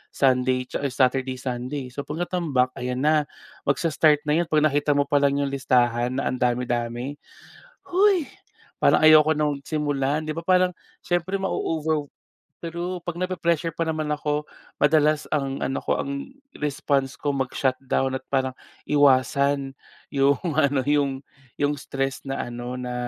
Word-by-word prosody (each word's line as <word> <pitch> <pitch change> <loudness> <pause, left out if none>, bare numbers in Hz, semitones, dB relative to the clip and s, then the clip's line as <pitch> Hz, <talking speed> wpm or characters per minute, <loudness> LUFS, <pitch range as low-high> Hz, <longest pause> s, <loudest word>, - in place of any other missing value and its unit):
Sunday 130 -1 +2 0.2
or 140 - -1
Saturday, 130 0 +1
Sunday. 125 +1 -4
So 140 +3 -6
'pag 160 +4 -2
natambak 150 -9 0
ayan 125 +2 -2
na, 150 -1 +3 0.4
magsa-start 150 0 +3
na 150 +2 +2
yun 175 - 0
pag 155 -1 +2
nakita 145 -1 +2
mo 140 - +3
palang 140 -2 +2
yung 140 - -2
listahan 125 -2 +1
na 135 - -1
ang 130 - -4
dami-dami. 120 +2 -1 0.7
"Hoy! 375 -3 +3 0.6
Parang - - +5
ayoko 155 0 +7
nang 145 -2 0
simulan", 150 0 -1
'di 155 - -3
ba. 165 - -5
Parang 185 0 +3 0.2
siyempre 175 +3 -1
mauugaw, 160 -5 -1 0.6
pero 175 +1 -4
'pag 175 0 -5
napre-pressure 170 -3 -1
pa 165 - 0
naman 155 -1 -2
ako 150 0 -2 0.3
madalas 150 0 +3
ang 135 -2 -1
ano 135 - -2
ko - - 0
ang 140 - -5 0.2
response 140 -2 -1
ko 145 -1 -1
mag 130 -1 -2
shutdown 130 0 0
at 130 - -8
parang 130 -1 0 0.3
iwasan 140 -1 +3 0.3
yung 140 -1 +2 0.2
ano, 145 -3 +3
yung 140 -2 +1 0.4
yung 145 +1 +1
stress 135 -1 -3
na 135 -1 -3
ano 120 +1 -6
na, 125 0 -4
145 Hz, 150 wpm, -24 LUFS, 130-155 Hz, 0.7 s, ayoko